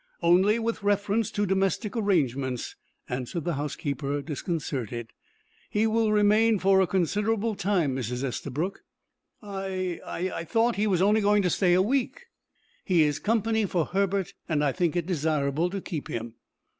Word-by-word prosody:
"Only 185 +6 +4
with 230 -1 -2
reference 205 +1 +1
to 205 - -1
domestic 195 +2 0
arrangements," 140 - 0 0.3
answered 125 +6 -4
the 175 - -1
housekeeper, 145 0 -3
disconcerted. 130 - -4 0.6
"He 210 +1 +1
will 225 0 +2
remain 215 +1 +4
for 190 0 +4
a 190 - +2
considerable 210 +5 0
time, 180 -9 0
Mrs. 125 0 -3
Estabrook." 145 +7 -3 0.6
"I 190 -3 -3
I 180 -1 -3
thought 230 +7 +1
he 210 +1 +1
was 185 -3 +2
only 210 +2 +4
going 205 0 +3
to 180 - +1
stay 180 -3 +3
a 185 - +4
week." 260 - -1 0.6
"He 175 -4 +3
is 150 -1 0
company 220 -1 +1
for 175 -4 0
Herbert, 195 0 -1 0.2
and 150 -2 +1
I 145 - +2
think 175 -1 0
it 175 -2 0
desirable 155 -1 0
to 195 +2 -4
keep 160 -6 -5
him." 115 0 -5
185 Hz, 155 wpm, -27 LUFS, 150-205 Hz, 0.6 s, Only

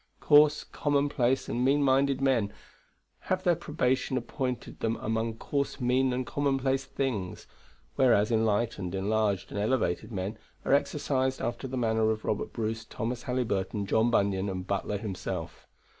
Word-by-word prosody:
Coarse, 150 0 +5
commonplace, 140 -3 0
and 120 - -1
mean 140 +2 +3
minded 135 0 +3
men 125 -7 +2 0.8
have 185 0 +1
their 175 - +4
probation 130 -5 0
appointed 125 +1 -4
them 115 0 0
among 115 0 -2
coarse, 140 +4 -2
mean, 130 +1 +2
and 125 +1 -1
commonplace 135 0 0
things; 120 -10 -3 0.5
whereas 115 -5 +4
enlightened, 110 -4 0
enlarged, 100 0 0
and 100 - -3
elevated 105 -2 0
men 100 +2 -4 0.3
are - - +2
exercised 135 -2 +1
after 120 +2 -3
the 130 0 -4
manner 110 -2 +2
of 110 0 -2
Robert 105 - -1
Bruce, 110 -1 -3
Thomas 115 +2 -4
Halyburton, 105 -5 -1
John 110 +4 +2
Bunyan, 100 -3 +1
and 90 -1 -4
Butler 100 +1 -1
himself. 95 -4 -5
120 Hz, 145 wpm, -29 LUFS, 105-135 Hz, 0.8 s, Coarse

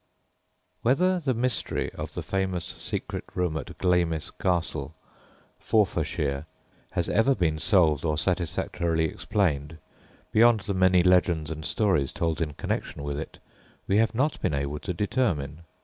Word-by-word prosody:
Whether 180 +9 +3
the 135 -6 0
mystery 125 +2 -1
of - - -7
the - - -3
famous 95 -2 -1
secret - - -4
room 90 -3 0
at 80 - -6
Glamis 85 -4 +1
Castle, 90 -2 -1 0.6
Forfarshire, 75 -8 0 0.5
has - - 0
ever 120 +5 +3
been 80 -5 0
solved 80 -7 +3
or 75 -2 0
satisfactorily 85 -1 0
explained 80 -4 -1 0.5
beyond 115 0 +5
the 100 +2 -3
many 95 -1 +4
legends 85 -4 +3
and 80 0 -5
stories 90 - +1
told 80 0 -1
in 75 -3 -1
connection 70 - -3
with 70 0 -3
it, 80 - -7 0.5
we 100 - +2
have 115 +1 +2
not 140 +6 0
been 75 - 0
able 70 +1 -2
to 75 - -4
determine. 90 - -1
90 Hz, 140 wpm, -27 LUFS, 80-105 Hz, 0.6 s, beyond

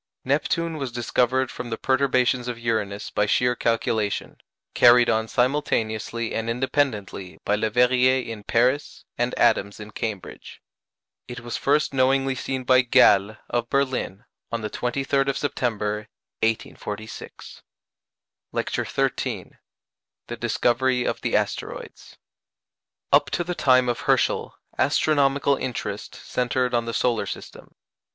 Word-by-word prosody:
Neptune 160 +4 0
was 135 -4 -4
discovered 125 +2 0
from 120 - -6
the 115 - -3
perturbations 130 -2 +1
of 120 -2 -3
Uranus 110 -3 -2
by 105 - +1
sheer 125 +3 +2
calculation, 110 -3 -1 0.4
carried 120 0 +6
on 110 0 0
simultaneously 115 -3 -1
and 115 +1 -2
independently 115 - -1
by 105 - +2
Leverrier 125 +4 +3
in 115 -2 -6
Paris, 125 +7 0
and 120 +1 -1
Adams 100 +1 +2
in 105 0 -9
Cambridge. 105 -3 -6 0.7
It 125 0 -7
was 120 0 -5
first 150 +1 +1
knowingly 135 0 +2
seen 130 0 -4
by 130 0 +5
Galle, 105 -3 +4
of 120 -1 -2
Berlin, 130 -8 -1 0.3
on 115 0 -2
the 105 -1 -4
23rd 135 +2 0
of 140 - 0
September, 105 -6 -2 0.3
1846. 110 -1 -4 0.9
LECTURE - - -2
XIII - - -2 0.7
THE - - -6
DISCOVERY 125 +1 +1
OF - - -2
THE - - -1
ASTEROIDS - - -4 1.0
Up - - +5
to 175 - -1
the 180 +1 -3
time 130 -5 +4
of 120 -1 -1
Herschel, - - +1 0.2
astronomical 140 -2 +2
interest 105 -5 -5
centred 125 0 -1
on 120 -1 +1
the 115 - -4
solar 120 -3 +1
system. - - -9
125 Hz, 125 wpm, -24 LUFS, 110-130 Hz, 1.0 s, carried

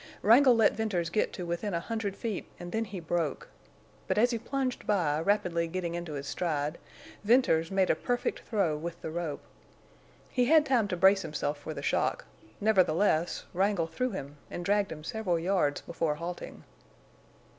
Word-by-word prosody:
Wrangle 245 +4 +7
let 225 -2 +4
Venters 185 -7 -1
get 210 - +1
to 180 - -5
within 175 +3 -2
a - - +1
hundred 205 +1 -3
feet 220 -3 -4
and 175 0 -7
then 225 +1 -1
he 195 -3 -7
broke. 165 -3 -2 0.6
But 185 - 0
as 240 +3 +4
he 230 - -1
plunged 260 +1 -3
by, 165 -8 +2
rapidly 170 -3 +1
getting 170 0 -3
into 170 -2 -5
his 140 -1 -5
stride, 150 -1 -2 0.4
Venters 205 -8 +3
made 190 -1 +2
a - - +2
perfect 245 +9 -2
throw 195 -9 0
with 170 +3 -6
the 160 - -4
rope. 165 -3 -4 0.9
He 250 -1 +2
had 310 +3 +5
time 250 -7 +2
to 180 - -3
brace 190 +2 +5
himself 150 -3 -3
for - - -6
the - - -6
shock; - - 0 0.3
nevertheless, 185 -4 +2
Wrangle 190 -1 +1
threw 210 +11 -2
him 145 - -7
and 175 - -5
dragged 205 0 +2
him 155 -1 -7
several 205 -3 -1
yards 165 -4 +1
before 165 -3 -2
halting. 170 +3 -7
180 Hz, 175 wpm, -29 LUFS, 165-215 Hz, 0.9 s, Wrangle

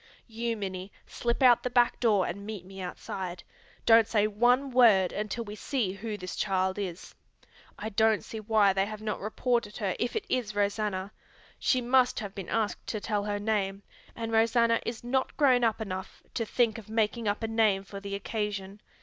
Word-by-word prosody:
You, 230 0 -3
Minnie, 190 -1 -5
slip 240 +3 -2
out 245 -2 +7
the 250 - -2
back 245 -1 +3
door 210 -6 +3
and 200 +3 -5
meet 205 -3 -7
me 190 0 -9
outside. 180 0 -5 0.4
Don't 225 -1 +6
say 210 -2 +2
one 245 +6 +2
word 220 -7 +5
until 215 +3 -3
we 205 -2 -8
see 215 -1 -1
who 210 +2 -5
this 185 -2 -6
child 190 -1 0
is. 185 -3 -5 0.6
I 215 - -4
don't 220 0 +2
see 220 - -7
why 215 -2 +3
they 195 +1 +1
have 215 0 -7
not 215 - -2
reported 220 0 -1
her 195 -5 -1
if 240 - -1
it 440 - -2
is 225 -5 -1
Rosanna. 205 -1 -1 0.5
She 255 - +2
must 250 +1 +3
have 205 -3 -6
been 195 -4 -7
asked 220 -2 -1
to 215 - -2
tell 205 -1 -1
her 205 -1 -1
name, 205 -2 -1 0.3
and 225 -1 -4
Rosanna 230 +1 +3
is 230 -1 -4
not 260 +2 -1
grown 255 -5 +4
up 225 -1 +2
enough 190 -3 -6
to 230 -2 -2
think 230 -2 +1
of 215 - -14
making 220 +1 0
up 205 +2 -1
a - - 0
name 220 -3 +2
for 200 0 -8
the 200 0 -5
occasion. 205 -1 -4
215 Hz, 190 wpm, -29 LUFS, 200-230 Hz, 0.6 s, out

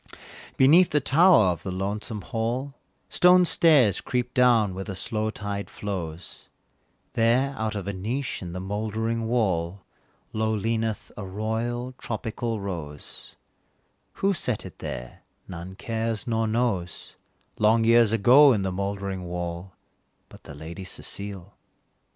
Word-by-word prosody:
Beneath 165 +7 +6
the 150 - +2
tower 160 - +5
of 85 -2 -5
the - - -5
lonesome 100 +3 -3
hall, 120 +7 -3 0.3
Stone 180 0 +5
stairs 145 - +4
creep 125 0 -2
down 120 -6 +4
where 95 +1 -5
the 95 -1 -6
slow 110 +2 -2
tide 100 -2 -5
flows, 85 -5 -6 0.6
There, 125 +3 +2
out 110 -1 -2
of 100 -3 -4
a 100 - -3
niche 115 +8 -3
in 90 -2 -6
the 90 - -5
mouldering 110 +3 -2
wall, 95 -6 0 0.5
Low 110 0 0
leaneth 110 +1 -2
a 105 - -6
royal 110 +5 -3
tropical 115 0 -3
rose: 85 -7 -7 0.8
Who 195 +1 +1
set 125 - -2
it 95 - -11
there - - -7 0.3
none 90 +1 -8
cares, 115 0 -3
nor 115 -2 0
knows, 110 -7 -2 0.4
Long 110 +2 +4
years 115 -1 +5
ago 125 +6 +7
in 100 -4 0
the 95 - -1
mouldering 100 -1 -3
wall, 90 +1 -5 0.6
But - - -16
the 70 - -9
Lady 80 +5 -8
Cecile. 100 +1 -4
110 Hz, 135 wpm, -25 LUFS, 95-120 Hz, 0.8 s, ago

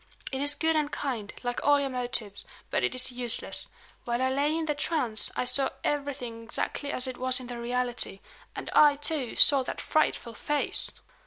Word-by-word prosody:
"It 265 0 -3
is 290 +1 +3
good 320 0 +1
and 300 -2 0
kind, 235 -8 -3
like 245 0 -2
all 290 0 +5
your 275 -1 -2
motives; 240 -5 -2 0.3
but - - 0
it - - 0
is 255 0 +2
useless. 245 -1 -2 0.3
While 240 0 -1
I 260 0 +1
lay 290 +4 +1
in 325 - -1
the 300 - 0
trance 270 -7 +1
I - - 0
saw 265 +2 +2
everything 270 -5 -3
exactly 260 +5 -2
as 255 - +1
it 255 -1 -4
was 255 +1 +4
in 255 - -8
the 240 -1 -7
reality; 245 -4 -2 0.4
and - - -6
I, 295 -1 +7
too, 290 -4 -1
saw 280 -2 +7
that 255 - -5
frightful 305 -6 0
face!" 295 +6 -1
255 Hz, 190 wpm, -28 LUFS, 245-290 Hz, 0.4 s, I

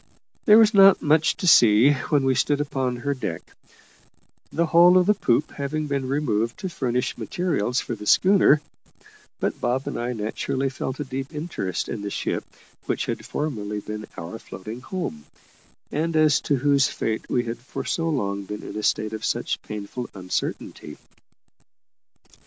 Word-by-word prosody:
There 215 -2 +8
was 220 -1 +6
not 195 -1 +7
much 155 +1 +3
to - - -4
see 115 -2 +7 0.2
when 145 -3 +3
we 130 - +3
stood 145 +2 +1
upon 135 -4 -1
her 140 +4 -2
deck 95 -11 -5 1.1
the 170 - +1
whole 175 +2 +6
of 180 - +4
the 210 - +4
poop 150 - +1
having 150 +2 -3
been 140 -2 -2
removed 120 -5 -1
to 190 - -4
furnish 125 -7 -2
materials 125 - -1
for - - -5
the 105 -2 -8
schooner; 185 -6 +5 0.8
but - - -2
Bob 130 +2 0
and - - -4
I 120 +1 -2
naturally 125 +5 -2
felt 130 0 -5
a - - -1
deep 135 0 -5
interest 150 - -4
in 110 - -5
the 100 - -4
ship - - -2 0.4
which - - -1
had - - -4
formerly 105 -9 -3
been 105 +1 -7
our 85 +7 -7
floating 110 +4 -9
home, 130 - -5 0.7
and 160 +2 -1
as 155 -2 +4
to 145 - +4
whose 140 +1 +3
fate 110 -6 -3
we 120 - +1
had 115 0 -5
for 125 - -7
so 165 -1 -1
long 100 -9 -2
been 105 +1 -7
in - - -8
a 105 - -3
state 110 0 0
of 110 - -6
such - - -1
painful 105 +4 -6
uncertainty. 90 -4 -4
130 Hz, 170 wpm, -24 LUFS, 110-150 Hz, 1.1 s, There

